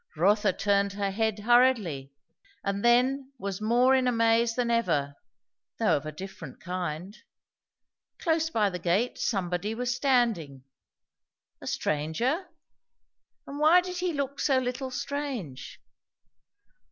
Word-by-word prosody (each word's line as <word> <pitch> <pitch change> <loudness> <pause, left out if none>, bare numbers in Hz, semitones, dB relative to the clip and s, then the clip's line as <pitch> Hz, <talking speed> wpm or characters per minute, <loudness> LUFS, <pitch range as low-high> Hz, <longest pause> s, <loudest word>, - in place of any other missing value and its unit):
Rotha 205 +4 +3
turned 200 +1 +1
her 200 -1 -2
head 220 +1 0
hurriedly, 215 - +3 0.5
and 200 0 -2
then 260 +3 +3
was 200 -2 -5
more 240 +4 +4
in 260 -1 +3
a - - +3
maze 230 0 +2
than 245 -1 0
ever, 165 -12 +1 0.6
though - - +3
of 155 - -4
a - - -4
different 190 +6 -9
kind. 180 +1 -5 1.0
Close 320 -2 0
by 210 -9 +1
the 180 - -5
gate 185 +8 0
somebody 195 +1 -1
was 245 +1 -1
standing. 230 - 0 1.0
A - - -9
stranger? 230 - -1 1.0
And 280 +1 -7
why 315 +4 +6
did 360 0 -5
he 360 0 -1
look 280 -2 -3
so 270 -2 +2
little 260 +1 -2
strange? 255 - -5
225 Hz, 130 wpm, -28 LUFS, 185-260 Hz, 1.0 s, why